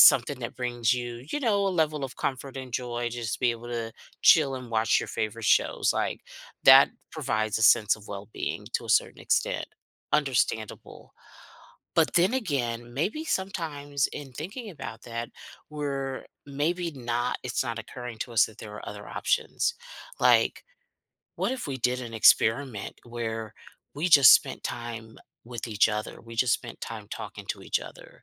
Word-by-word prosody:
something 135 Hz, +2 st, +7 dB
that 115 Hz, -, -5 dB
brings 120 Hz, -2 st, 0 dB
you, 120 Hz, 0 st, -5 dB
you 295 Hz, -, -1 dB
know, 205 Hz, -6 st, +2 dB
a -, -, +2 dB
level 155 Hz, -5 st, 0 dB
of 130 Hz, -, -7 dB
comfort 135 Hz, 0 st, -3 dB
and 130 Hz, -1 st, -7 dB
joy 120 Hz, -1 st, -2 dB
just 120 Hz, -2 st, -3 dB
to -, -, -9 dB
be 125 Hz, -2 st, +3 dB
able 115 Hz, +1 st, -9 dB
to 115 Hz, -1 st, -3 dB, 0.3 s
chill 140 Hz, -4 st, +6 dB
and 125 Hz, -2 st, -9 dB
watch 110 Hz, 0 st, +3 dB
your -, -, -5 dB
favorite 110 Hz, +1 st, -3 dB
shows? -, -, +3 dB
Like, -, -, -1 dB, 0.4 s
that -, -, +9 dB, 0.2 s
provides 110 Hz, -1 st, -1 dB
a 110 Hz, -, -2 dB
sense 105 Hz, 0 st, +5 dB
of 105 Hz, -1 st, -15 dB
well-being 100 Hz, +2 st, -5 dB
to -, -, 0 dB
a -, -, -3 dB
certain -, -, +2 dB
extent. -, -, 0 dB, 0.5 s
Understandable, 125 Hz, -7 st, -1 dB, 0.8 s
but -, -, +4 dB
then 180 Hz, +7 st, +4 dB
again, 120 Hz, -, -2 dB
maybe 205 Hz, -, -1 dB
sometimes 150 Hz, -, -2 dB
in 140 Hz, -3 st, -8 dB
thinking 200 Hz, -, -6 dB
about 115 Hz, -9 st, -8 dB
that, 115 Hz, -1 st, -5 dB, 0.4 s
we're 140 Hz, -3 st, -3 dB, 0.2 s
maybe 165 Hz, +5 st, -1 dB
not 120 Hz, -2 st, -2 dB
it's 125 Hz, +1 st, -1 dB
not 115 Hz, -2 st, -3 dB
occurring 120 Hz, +1 st, -8 dB
to 120 Hz, -, -4 dB
us 115 Hz, -, +5 dB
that 110 Hz, -, -16 dB
there 105 Hz, -1 st, -9 dB
are 105 Hz, -, -9 dB
other 105 Hz, 0 st, -8 dB
options. 475 Hz, 0 st, 0 dB, 0.5 s
Like, -, -, +4 dB, 0.7 s
what -, -, 0 dB
if 260 Hz, -, -4 dB
we 135 Hz, -, -2 dB
did 125 Hz, +1 st, +1 dB
an 120 Hz, -2 st, -7 dB
experiment 110 Hz, 0 st, +3 dB
where 115 Hz, -2 st, -5 dB, 0.4 s
we 155 Hz, +5 st, 0 dB
just 140 Hz, -6 st, +9 dB
spent -, -, 0 dB
time 115 Hz, -2 st, -6 dB, 0.3 s
with 120 Hz, -1 st, -6 dB
each 110 Hz, 0 st, +3 dB
other? 105 Hz, 0 st, -4 dB
We 115 Hz, 0 st, -11 dB
just 120 Hz, 0 st, +3 dB
spent -, -, -7 dB
time -, -, -6 dB
talking -, -, -7 dB
to -, -, -6 dB
each -, -, 0 dB
other, -, -, -13 dB
125 Hz, 170 wpm, -27 LUFS, 115-145 Hz, 0.8 s, that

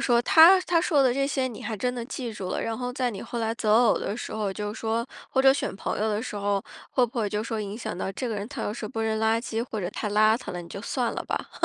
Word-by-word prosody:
说 240 Hz, -2 st, +4 dB
他 335 Hz, +8 st, +8 dB
他 340 Hz, -3 st, +2 dB
说 300 Hz, -5 st, +3 dB
的 255 Hz, -2 st, +4 dB
这 275 Hz, +1 st, +1 dB
些 270 Hz, -2 st, 0 dB
你 240 Hz, -4 st, -7 dB
还 220 Hz, 0 st, -3 dB
真 250 Hz, +5 st, -1 dB
的 240 Hz, -1 st, -4 dB
记 250 Hz, -3 st, -5 dB
住 195 Hz, -3 st, -5 dB
了， -, -, -1 dB
然 225 Hz, -1 st, -2 dB
后 250 Hz, 0 st, -3 dB
在 250 Hz, -1 st, 0 dB
你 205 Hz, -, -7 dB
后 240 Hz, -, -5 dB
来 225 Hz, 0 st, -1 dB
择 215 Hz, -2 st, +1 dB
偶 235 Hz, 0 st, +5 dB
的 205 Hz, -, -3 dB
时 -, -, -6 dB
候 210 Hz, -2 st, -2 dB
就 210 Hz, +1 st, -4 dB
是 -, -, -9 dB
说 225 Hz, +1 st, -1 dB, 0.2 s
或 265 Hz, -, +2 dB
者 270 Hz, 0 st, +7 dB
选 275 Hz, -, -2 dB
朋 -, -, -3 dB
友 220 Hz, -, +1 dB
的 210 Hz, 0 st, 0 dB
时 250 Hz, -, -6 dB
候， 200 Hz, -1 st, 0 dB, 0.3 s
会 255 Hz, -, +3 dB
不 235 Hz, +1 st, -6 dB
会 210 Hz, -, +1 dB
就 210 Hz, +1 st, -2 dB
说 225 Hz, -1 st, -3 dB
影 205 Hz, 0 st, -5 dB
响 235 Hz, -, -5 dB
到 190 Hz, -, -3 dB
这 250 Hz, +5 st, -3 dB
个 225 Hz, -, -2 dB
人 205 Hz, +1 st, -4 dB
他 275 Hz, -, -5 dB
要 205 Hz, -, -2 dB
是 215 Hz, -1 st, -5 dB
不 225 Hz, -, -4 dB
扔 220 Hz, -1 st, 0 dB
垃 220 Hz, +1 st, +2 dB
圾 230 Hz, -2 st, -3 dB
或 215 Hz, -, -3 dB
者 175 Hz, -, -2 dB
太 210 Hz, -, -3 dB
邋 215 Hz, +2 st, +5 dB
遢 -, -, -7 dB
了， 175 Hz, -, -4 dB
你 170 Hz, -, -12 dB
就 195 Hz, -, -7 dB
算 240 Hz, +2 st, -1 dB
了 -, -, -4 dB
吧？ -, -, -3 dB
225 Hz, 335 characters per minute, -26 LUFS, 210-250 Hz, 0.3 s, 他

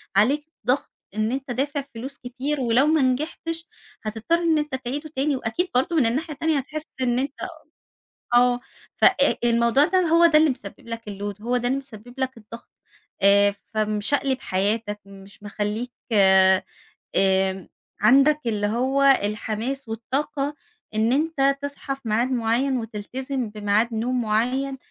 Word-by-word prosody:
عليك 270 Hz, +9 st, +3 dB, 0.2 s
ضغط 255 Hz, +3 st, +1 dB, 0.2 s
إن 215 Hz, +1 st, 0 dB
أنت 265 Hz, 0 st, -4 dB
دافع 280 Hz, +4 st, -1 dB
فلوس 270 Hz, +1 st, -9 dB
كتير 265 Hz, +4 st, -3 dB
ولو 245 Hz, +2 st, +3 dB
ما 315 Hz, -1 st, +3 dB
نجحتش 315 Hz, +5 st, -2 dB, 0.4 s
هتضطر 220 Hz, +9 st, 0 dB
إن 325 Hz, -2 st, +3 dB
أنت 300 Hz, -2 st, -2 dB
تعيده 265 Hz, +5 st, -5 dB
تاني، 280 Hz, +2 st, +1 dB
وأكيد 260 Hz, +9 st, -2 dB
برضه 265 Hz, +7 st, +1 dB
من 295 Hz, -6 st, +4 dB
الناحية 290 Hz, +8 st, -1 dB
التانية 315 Hz, +1 st, 0 dB
هتحس 300 Hz, +3 st, -4 dB, 0.2 s
إن 245 Hz, -1 st, +1 dB
أنت 275 Hz, +1 st, -2 dB, 1.0 s
آه 245 Hz, 0 st, +5 dB, 0.4 s
ف -, -, -6 dB
أ 295 Hz, -7 st, +4 dB
الموضوع 235 Hz, +4 st, +4 dB
ده 370 Hz, +3 st, +2 dB
هو 335 Hz, 0 st, +4 dB
ده 325 Hz, -2 st, +6 dB
اللي 315 Hz, 0 st, +4 dB
مسبب 230 Hz, -5 st, -7 dB
لك 230 Hz, 0 st, -5 dB
الload، 205 Hz, 0 st, -6 dB
هو 245 Hz, +3 st, 0 dB
ده 245 Hz, 0 st, -1 dB
اللي 260 Hz, +2 st, +1 dB
مسبب 245 Hz, -3 st, -10 dB
لك 260 Hz, -1 st, -2 dB
الضغط، 230 Hz, +1 st, -12 dB, 0.5 s
آآ 200 Hz, +1 st, +5 dB, 0.2 s
فمشقلب 215 Hz, +6 st, 0 dB
حياتك، 205 Hz, +2 st, -1 dB
مش 195 Hz, +1 st, -14 dB
مخليك، 210 Hz, +4 st, -3 dB, 1.2 s
آمم، 190 Hz, -1 st, +2 dB, 0.3 s
عندك 275 Hz, +7 st, +5 dB
اللي 210 Hz, -2 st, 0 dB
هو 260 Hz, +5 st, +1 dB, 0.2 s
الحماس 220 Hz, +5 st, -3 dB
والطاقة 275 Hz, +5 st, -2 dB, 0.4 s
إن 220 Hz, +2 st, +2 dB
أنت 275 Hz, -2 st, +2 dB
تصحى 280 Hz, -1 st, -4 dB
في 270 Hz, -, -23 dB
ميعاد 235 Hz, +5 st, +1 dB
معيّن 250 Hz, +2 st, +1 dB
وتلتزم 245 Hz, +3 st, -4 dB
بميعاد 210 Hz, +2 st, 0 dB
نوم 245 Hz, +3 st, 0 dB
معيّن، 250 Hz, +5 st, 0 dB
250 Hz, 145 wpm, -24 LUFS, 220-275 Hz, 1.2 s, ده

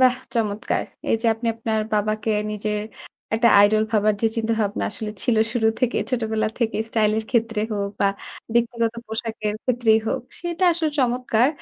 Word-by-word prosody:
বাহ 255 Hz, -1 st, +6 dB, 0.2 s
চমৎকার। 215 Hz, -2 st, 0 dB, 0.3 s
এই -, -, +4 dB
যে -, -, +1 dB
আপনি 230 Hz, +2 st, -6 dB
আপনার 220 Hz, -1 st, -1 dB
বাবাকে 215 Hz, +1 st, 0 dB, 0.2 s
নিজের 210 Hz, 0 st, -2 dB, 0.5 s
একটা 235 Hz, +2 st, +4 dB, 0.2 s
idol 215 Hz, +1 st, +3 dB
ভাবার 215 Hz, -1 st, +3 dB
যে -, -, +5 dB
চিন্তা 225 Hz, 0 st, 0 dB
ভাবনা 205 Hz, -1 st, -1 dB
আসলে 215 Hz, 0 st, -5 dB
ছিল 240 Hz, -3 st, +2 dB, 0.2 s
শুরু 225 Hz, -2 st, +2 dB
থেকে 250 Hz, -2 st, +1 dB
ছোটবেলা 220 Hz, -3 st, 0 dB
থেকেই 225 Hz, -2 st, 0 dB
স্টাইল 215 Hz, -2 st, +2 dB, 0.2 s
ক্ষেত্রে 225 Hz, -3 st, +1 dB
হোক 200 Hz, -1 st, -2 dB
বা 200 Hz, -, +4 dB, 0.5 s
ব্যক্তিগত 235 Hz, -1 st, +1 dB
পোশাকের 220 Hz, -1 st, -3 dB
ক্ষেত্রেই 235 Hz, -3 st, +3 dB
হোক -, -, 0 dB, 0.2 s
সেটা 345 Hz, +1 st, -1 dB
আসলে 325 Hz, -2 st, 0 dB
চমৎকার। 250 Hz, -1 st, +2 dB
225 Hz, 160 wpm, -23 LUFS, 215-240 Hz, 0.5 s, বাহ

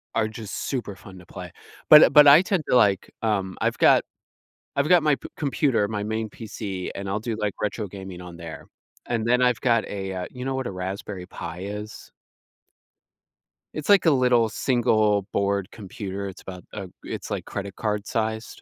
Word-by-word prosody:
are 110 Hz, -, +2 dB
just 110 Hz, -2 st, -6 dB
super 120 Hz, -7 st, -3 dB
fun 95 Hz, -1 st, -13 dB
to 90 Hz, -, -15 dB
play, -, -, -9 dB, 0.4 s
but 150 Hz, +1 st, +11 dB
uh, -, -, +6 dB
but 150 Hz, -1 st, +8 dB
I 145 Hz, +5 st, +9 dB
tend 190 Hz, -4 st, -1 dB
to, -, -, +3 dB
like 105 Hz, -5 st, +3 dB
um, 100 Hz, -4 st, -1 dB
I've -, -, 0 dB
got -, -, +5 dB
p -, -, -53 dB, 0.7 s
I've 140 Hz, +2 st, +1 dB
got 175 Hz, -3 st, +6 dB
my 150 Hz, -2 st, +3 dB, 0.2 s
computer 135 Hz, -7 st, +1 dB
my 105 Hz, -2 st, -3 dB
main 110 Hz, 0 st, -2 dB
PC, 100 Hz, -4 st, -6 dB
and 100 Hz, 0 st, -5 dB
I'll 100 Hz, +2 st, -1 dB
do, 115 Hz, -1 st, -3 dB
like, 105 Hz, -2 st, -1 dB
retro 105 Hz, 0 st, -2 dB
gaming 95 Hz, -2 st, -9 dB
on 90 Hz, -1 st, -10 dB
there, 85 Hz, -2 st, -9 dB, 0.4 s
and 115 Hz, -2 st, -1 dB
then 125 Hz, +1 st, +3 dB
I've 125 Hz, -3 st, +2 dB
got 115 Hz, -3 st, +2 dB
a, 95 Hz, -1 st, -4 dB
uh, 90 Hz, -1 st, -4 dB
you 125 Hz, 0 st, -7 dB
know 135 Hz, -, -1 dB
what 130 Hz, -1 st, -3 dB
a -, -, -6 dB
Raspberry 95 Hz, 0 st, -5 dB
Pi 85 Hz, +2 st, -7 dB
is? 105 Hz, +2 st, -7 dB, 1.6 s
It's, 155 Hz, +2 st, -5 dB
like, 200 Hz, -4 st, +6 dB
a -, -, +7 dB
little 125 Hz, -4 st, +3 dB
single 110 Hz, -4 st, +2 dB
board 100 Hz, 0 st, 0 dB
computer, 100 Hz, -2 st, -6 dB
it's 95 Hz, -, -9 dB
about 90 Hz, -1 st, -9 dB
a 100 Hz, -3 st, -6 dB, 0.2 s
it's, -, -, -6 dB
like, -, -, -4 dB
credit 100 Hz, -1 st, -6 dB
card 105 Hz, -2 st, -2 dB
sized, 110 Hz, 0 st, -3 dB
105 Hz, 195 wpm, -24 LUFS, 100-125 Hz, 1.6 s, but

